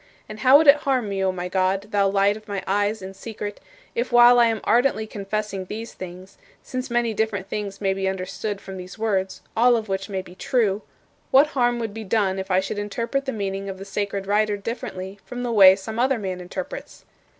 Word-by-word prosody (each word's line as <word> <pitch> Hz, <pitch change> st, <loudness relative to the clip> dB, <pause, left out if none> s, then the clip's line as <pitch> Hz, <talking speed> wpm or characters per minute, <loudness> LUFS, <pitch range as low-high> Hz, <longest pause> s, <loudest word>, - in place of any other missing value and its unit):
And 215 Hz, 0 st, -9 dB
how 260 Hz, +5 st, +7 dB
would 320 Hz, -, +3 dB
it 285 Hz, 0 st, +8 dB
harm 260 Hz, -7 st, 0 dB
me, 195 Hz, -1 st, -1 dB
O 190 Hz, -, +2 dB
my 180 Hz, -1 st, -4 dB
God, 190 Hz, +2 st, 0 dB
thou 200 Hz, -1 st, +3 dB
Light 200 Hz, +1 st, +3 dB
of 215 Hz, 0 st, -12 dB
my 200 Hz, -2 st, -4 dB
eyes 205 Hz, +1 st, 0 dB
in 190 Hz, +1 st, -7 dB
secret, 205 Hz, 0 st, -7 dB, 0.3 s
if 240 Hz, +2 st, -2 dB
while 240 Hz, 0 st, +7 dB
I 235 Hz, -, +6 dB
am 225 Hz, -1 st, 0 dB
ardently 235 Hz, -2 st, +2 dB
confessing 205 Hz, -2 st, -4 dB
these 220 Hz, +4 st, -7 dB
things 185 Hz, +1 st, -10 dB, 0.2 s
since 255 Hz, +1 st, -5 dB
many 240 Hz, -1 st, +1 dB
different 205 Hz, -3 st, -1 dB
things 200 Hz, -1 st, -4 dB
may 195 Hz, -2 st, +1 dB
be 190 Hz, 0 st, -2 dB
understood 190 Hz, +2 st, -3 dB
from 190 Hz, 0 st, -8 dB
these 185 Hz, +2 st, -9 dB
words, 195 Hz, -4 st, -1 dB
all 240 Hz, +2 st, +5 dB
of 220 Hz, -2 st, -3 dB
which 195 Hz, +1 st, -2 dB
may 190 Hz, -2 st, -3 dB
be 180 Hz, -, -13 dB
true 210 Hz, 0 st, 0 dB, 0.5 s
what 280 Hz, +3 st, +6 dB
harm 245 Hz, -2 st, +2 dB
would 225 Hz, -3 st, -4 dB
be 225 Hz, 0 st, -6 dB
done 195 Hz, -2 st, +1 dB
if 190 Hz, -, -5 dB
I 185 Hz, 0 st, +3 dB
should 195 Hz, +2 st, -4 dB
interpret 230 Hz, +6 st, -2 dB
the 270 Hz, -, -1 dB
meaning 195 Hz, -2 st, -3 dB
of 190 Hz, -, -6 dB
the 195 Hz, -, -8 dB
sacred 200 Hz, 0 st, -3 dB
writer 210 Hz, +1 st, +1 dB
differently 200 Hz, -3 st, -6 dB
from 245 Hz, 0 st, -6 dB
the 240 Hz, -, -2 dB
way 190 Hz, -4 st, +8 dB
some 220 Hz, +3 st, -6 dB
other 260 Hz, +1 st, +2 dB
man 185 Hz, -4 st, -4 dB
interprets? 180 Hz, 0 st, -7 dB
205 Hz, 215 wpm, -23 LUFS, 195-230 Hz, 0.5 s, it